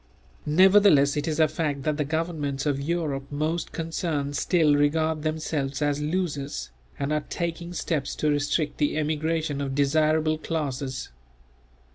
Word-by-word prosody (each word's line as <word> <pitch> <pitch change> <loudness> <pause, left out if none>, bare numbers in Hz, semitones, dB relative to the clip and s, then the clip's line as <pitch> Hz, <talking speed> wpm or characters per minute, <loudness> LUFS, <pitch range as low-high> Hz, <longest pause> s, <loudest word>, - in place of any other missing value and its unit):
Nevertheless 185 -4 +6
it 150 +1 -2
is 155 -1 -1
a 160 - +6
fact 145 -3 -2
that 155 0 0
the 150 - +1
governments 150 -3 -2
of 140 -2 0
Europe 145 -3 -2
most 155 +4 -2
concerned 160 -3 -2
still 155 0 +3
regard 155 +2 +1
themselves 155 -3 -2
as 145 -1 0
losers, 150 - -2 0.3
and 140 +2 -1
are 150 -1 0
taking 170 0 -3
steps 155 -4 -2
to 150 - +1
restrict 145 +1 0
the 150 0 +1
emigration 155 -1 -1
of 135 -1 -3
desirable 155 +2 +2
classes. 140 -5 -3
150 Hz, 140 wpm, -26 LUFS, 145-160 Hz, 0.3 s, Nevertheless